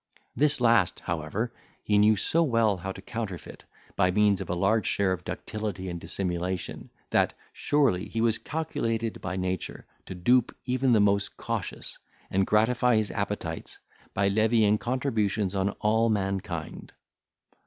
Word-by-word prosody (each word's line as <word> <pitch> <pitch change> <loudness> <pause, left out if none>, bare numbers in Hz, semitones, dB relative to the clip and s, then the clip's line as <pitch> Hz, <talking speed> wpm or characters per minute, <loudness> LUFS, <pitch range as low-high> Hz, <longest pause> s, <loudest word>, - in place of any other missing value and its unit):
This 150 -1 +3
last, 115 -7 +3
however, 85 +8 -3 0.3
he 105 -1 +3
knew 105 +1 +5
so 160 +11 +1
well 115 - +2
how 95 +2 -5
to 95 - -10
counterfeit, 110 -8 -6 0.3
by 90 - +3
means 100 0 +3
of 95 - -6
a 90 - 0
large 100 +5 +2
share 100 -2 +1
of 90 -3 -2
ductility 100 -4 -4
and 85 -1 -5
dissimulation, 90 +1 -3 0.2
that, - - +2 0.2
surely, 125 -10 +1
he 115 - -3
was 115 -1 +2
calculated 115 -8 -2
by 90 0 -3
nature 95 -1 -3 0.2
to 95 - -6
dupe 120 +7 +2
even 130 0 +2
the 110 - +5
most 100 -1 +2
cautious, - - -4 0.3
and 95 0 +2
gratify 120 +3 +3
his 110 -1 +1
appetites, 100 -6 -4 0.4
by 100 0 +2
levying 110 0 +3
contributions 110 -6 0
on 95 0 +1
all 110 +2 +3
mankind. 95 -6 -3
105 Hz, 145 wpm, -27 LUFS, 95-115 Hz, 0.4 s, knew